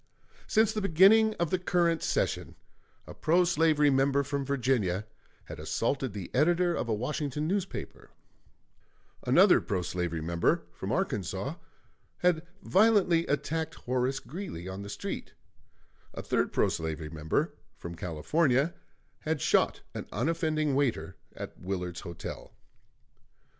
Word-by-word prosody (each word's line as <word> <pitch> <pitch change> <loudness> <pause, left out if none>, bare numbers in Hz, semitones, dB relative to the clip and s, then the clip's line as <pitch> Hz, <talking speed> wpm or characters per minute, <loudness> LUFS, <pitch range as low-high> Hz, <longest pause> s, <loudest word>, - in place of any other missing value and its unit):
Since 220 -1 +3
the 215 - -2
beginning 200 +5 +5
of 170 -2 -1
the 185 - +1
current 175 -2 +1
session, - - -1 0.5
a - - -9
pro 175 +3 +3
slavery 160 -4 +3
member 135 +1 +3
from 140 +1 -2
Virginia 125 -8 0 0.4
had - - -9
assaulted 115 - -1
the 100 -4 -7
editor 175 +5 +3
of 120 - -2
a - - +2
Washington 150 +5 -2
newspaper; 190 +1 -4 1.2
another - - +6
pro 95 -3 -2
slavery 90 -2 -2
member, 85 +1 +1
from - - -5
Arkansas, 95 - -2 0.6
had 175 -3 +2 0.2
violently 190 -5 +4
attacked 160 +3 -1
Horace 130 +2 -1
Greeley 155 - -7
on 95 +1 -6
the 100 - -7
street; 100 - -5 0.8
a - - -5
third - - 0
pro - - +2
slavery 80 -1 -4
member, 80 -1 -1 0.2
from 85 - -7
California, 125 - +1 0.5
had 155 -1 -2
shot - - +2
an - - -6
unoffending 155 - 0
waiter 135 -3 0 0.2
at - - -8
Willard's 90 -2 -4
Hotel. 85 -1 -8
140 Hz, 125 wpm, -29 LUFS, -, 1.2 s, another